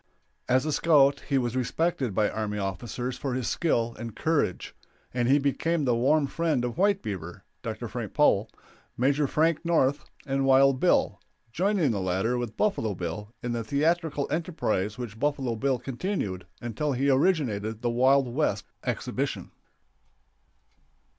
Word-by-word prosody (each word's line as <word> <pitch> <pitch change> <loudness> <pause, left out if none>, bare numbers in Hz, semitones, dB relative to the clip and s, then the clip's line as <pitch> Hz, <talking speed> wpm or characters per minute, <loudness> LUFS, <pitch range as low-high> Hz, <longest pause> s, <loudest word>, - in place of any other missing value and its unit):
As 130 +3 +3
a 155 - 0
scout 140 -3 +4
he 140 - +3
was 120 -2 -1
respected 130 - -1
by 105 -1 +3
army 105 -1 -3
officers 115 +6 -4
for 135 -3 -2
his 125 -2 -2
skill 120 -9 0
and 115 -2 -6
courage, 150 - -1 0.4
and 120 -1 0
he 135 +3 +5
became 145 +3 0
the 125 - +3
warm 140 +5 +3
friend 150 -3 0
of 120 - -4
"White 200 0 +3
Beaver" 90 -6 -6 0.2
(Dr. - - -5
Frank - - -6
Powell), - - +3 0.5
Maj. 135 +4 +2
Frank 160 +1 +1
North, 150 -4 +2 0.2
and 135 -1 0
Wild 135 0 +5
Bill, - - +2 0.3
joining 180 - +1
the 100 -3 -2
latter, 95 +6 0
with 120 -3 -4
Buffalo 115 - 0
Bill, 90 +5 -5
in 120 - -2
the 120 -1 -2
theatrical 150 +4 0
enterprise 145 - -1
which 115 -3 -7
Buffalo 135 -4 0
Bill 130 +3 0
continued 120 - -4 0.2
until 130 +5 -2
he 135 +2 +2
originated 125 - +1
the 120 - +1
Wild 130 +2 +4
West 120 -6 -1 0.2
exhibition. - - -3
130 Hz, 150 wpm, -27 LUFS, 115-150 Hz, 0.5 s, he